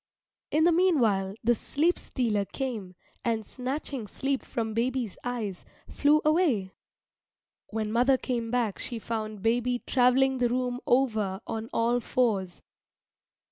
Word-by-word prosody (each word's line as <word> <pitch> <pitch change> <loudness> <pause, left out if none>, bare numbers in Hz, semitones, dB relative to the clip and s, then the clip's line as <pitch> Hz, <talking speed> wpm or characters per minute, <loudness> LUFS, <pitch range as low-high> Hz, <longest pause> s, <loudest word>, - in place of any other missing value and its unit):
In 310 +1 +2
the 345 - +5
meanwhile 235 - +2
the 240 +2 +4
Sleep 310 +9 0
stealer 220 -5 0
came 215 -5 -5 0.3
and, 225 -2 0
snatching 260 -1 -4
sleep 270 +5 -1
from 225 -2 -3
baby's 240 -2 -1
eyes, 225 -7 -3 0.2
flew 295 +2 +3
away. 305 - +2 1.0
When 215 -1 -3
mother 250 +4 +4
came 240 -3 -2
back 235 -4 0
she 240 - -3
found 215 -2 -4
baby 245 +2 +2
travelling 260 +1 +3
the 245 -1 +2
room 250 0 -1
over 220 -7 +2
on 225 +1 -4
all 235 +1 +2
fours. 210 -7 0
240 Hz, 130 wpm, -28 LUFS, 220-260 Hz, 1.0 s, the